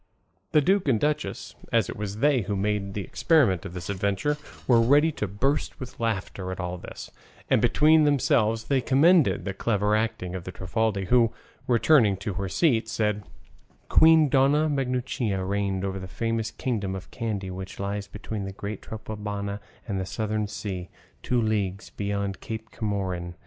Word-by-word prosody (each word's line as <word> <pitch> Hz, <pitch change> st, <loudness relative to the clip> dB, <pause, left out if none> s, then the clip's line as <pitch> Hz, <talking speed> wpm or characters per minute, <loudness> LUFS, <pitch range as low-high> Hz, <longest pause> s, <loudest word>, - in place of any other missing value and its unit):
The 150 Hz, -, +5 dB
duke 190 Hz, +3 st, +2 dB
and 120 Hz, -5 st, +3 dB
duchess, 150 Hz, +3 st, -2 dB, 0.2 s
as -, -, +3 dB
it -, -, -6 dB
was 105 Hz, -1 st, -5 dB
they 140 Hz, +1 st, +3 dB
who 105 Hz, -, -3 dB
had 95 Hz, -, -1 dB
made 105 Hz, -2 st, -1 dB
the 100 Hz, -, -2 dB
experiment 115 Hz, -, +2 dB
of 90 Hz, -, -10 dB
this 85 Hz, -1 st, -6 dB
adventure, 100 Hz, +8 st, 0 dB, 0.3 s
were 120 Hz, -2 st, +6 dB
ready 145 Hz, +7 st, +4 dB
to 105 Hz, -, -3 dB
burst 130 Hz, +10 st, -1 dB
with 130 Hz, -1 st, -9 dB
laughter 100 Hz, -4 st, -2 dB
at 95 Hz, -, -6 dB
all 90 Hz, -1 st, -3 dB
this, -, -, -9 dB, 0.4 s
and -, -, +4 dB
between 155 Hz, +1 st, +5 dB
themselves 115 Hz, -6 st, +2 dB
they 135 Hz, +2 st, +1 dB
commended 155 Hz, +6 st, +4 dB
the 95 Hz, -, -2 dB
clever 105 Hz, 0 st, +1 dB
acting 110 Hz, -5 st, -2 dB
of 95 Hz, -2 st, -5 dB
the 90 Hz, -, -6 dB
Trifaldi, 100 Hz, +2 st, -1 dB
who, 120 Hz, -3 st, +4 dB, 0.4 s
returning 120 Hz, -4 st, +4 dB
to 100 Hz, +1 st, -4 dB
her 95 Hz, +1 st, -3 dB
seat, 115 Hz, -, +2 dB
said, 105 Hz, -2 st, 0 dB, 0.7 s
"Queen 160 Hz, -1 st, +6 dB
Dona 140 Hz, +3 st, +3 dB
Maguncia 125 Hz, -7 st, -1 dB
reigned 100 Hz, -1 st, -1 dB
over 95 Hz, 0 st, -3 dB
the 95 Hz, -, -7 dB
famous 115 Hz, +5 st, -2 dB
kingdom 105 Hz, -5 st, -2 dB
of 95 Hz, -, -9 dB
Kandy, 105 Hz, -6 st, -3 dB
which 95 Hz, +1 st, -7 dB
lies 100 Hz, +1 st, -3 dB
between 105 Hz, 0 st, -5 dB
the 95 Hz, -, -5 dB
great 100 Hz, +1 st, -6 dB
Trapobana 105 Hz, -2 st, -5 dB, 0.3 s
and 100 Hz, -3 st, -2 dB
the 95 Hz, -, -3 dB
Southern 110 Hz, 0 st, -2 dB
Sea, 95 Hz, -3 st, -5 dB, 0.3 s
two 125 Hz, -, 0 dB
leagues 105 Hz, -3 st, -1 dB
beyond 100 Hz, -2 st, -3 dB
Cape 110 Hz, 0 st, -6 dB
Comorin. 95 Hz, -5 st, -3 dB
105 Hz, 170 wpm, -26 LUFS, 95-125 Hz, 0.7 s, were